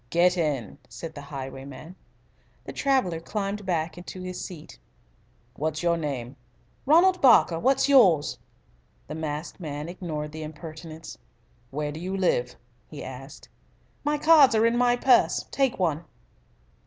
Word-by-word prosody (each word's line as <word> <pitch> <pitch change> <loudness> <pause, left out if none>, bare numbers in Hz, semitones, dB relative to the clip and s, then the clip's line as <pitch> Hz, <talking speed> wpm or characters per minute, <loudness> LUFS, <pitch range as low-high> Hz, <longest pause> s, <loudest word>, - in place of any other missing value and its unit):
"Get 180 +4 +3
in," 150 - -2
said 125 +8 -8
the 145 - -8
highwayman. 135 +3 -8 0.7
The - - -7
traveller 260 - +1
climbed 200 +3 -4
back 170 -1 -2
to 185 - -8
his 185 0 -5
seat. 155 - -10 0.8
"What 155 +1 -1
is 155 - -5
your 170 -1 +3
name?" 140 -5 -4 0.5
"Ronald 360 +5 +5
Barker. 230 -10 +5
What's 270 +7 +2
yours?" 195 - +4 0.7
The - - -7
masked 155 +2 -5
man 150 -2 -5
ignored 160 -4 -5
the 160 +1 -7
impertinence. 155 - -9 0.5
"Where 150 +2 -3
do 155 - -7
you 185 +3 -3
live?" 125 -10 0 0.3
he 150 - -9
asked. 135 +3 -10 0.6
"My 295 +1 +1
cards 295 -5 +6
are 220 +1 +4
in 230 +1 +3
my 245 0 +3
purse. 245 0 +3
Take 270 -3 +1
one." 165 -3 0
165 Hz, 140 wpm, -26 LUFS, 150-210 Hz, 0.8 s, cards